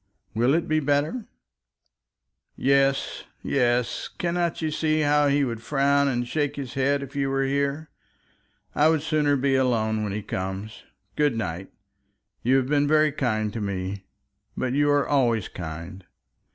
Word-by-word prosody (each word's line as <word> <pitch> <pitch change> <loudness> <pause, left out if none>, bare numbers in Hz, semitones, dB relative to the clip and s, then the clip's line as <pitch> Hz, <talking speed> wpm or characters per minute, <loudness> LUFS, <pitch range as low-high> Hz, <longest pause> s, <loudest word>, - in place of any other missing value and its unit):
"Will 120 +6 +3
it 170 - 0
be 155 0 +2
better?" 145 - 0 1.3
"Yes, 135 0 +1 0.2
yes. 120 -2 0
Cannot 175 -1 -2
you 155 -1 -1
see 155 0 +1
how 145 0 +3
he 140 0 +2
would 115 -4 -3
frown 140 +2 +2
and 120 -2 -1
shake 145 +1 -1
his 135 -3 -6
head 140 +1 +1
if 140 +1 -10
you 140 -1 0
were 135 0 +1
here? 140 +3 -1 0.8
I 150 +2 +4
would 160 -2 +1
sooner 150 -2 +2
be 135 0 +1
alone 115 -5 +1
when 105 - -2
he 105 +1 -4
comes. 95 +3 -5 0.3
Good 145 -5 +1
night. 90 -3 -4 0.7
You 130 +3 +3
have 130 -1 0
been 145 0 +2
very 155 0 +4
kind 110 -7 -1
to 115 - -4
me; 95 0 -4 0.5
but 130 -1 -1
you 145 +1 +2
are 145 -1 +2
always 120 -8 +2
kind. 85 +3 -8
135 Hz, 155 wpm, -25 LUFS, 115-145 Hz, 1.3 s, I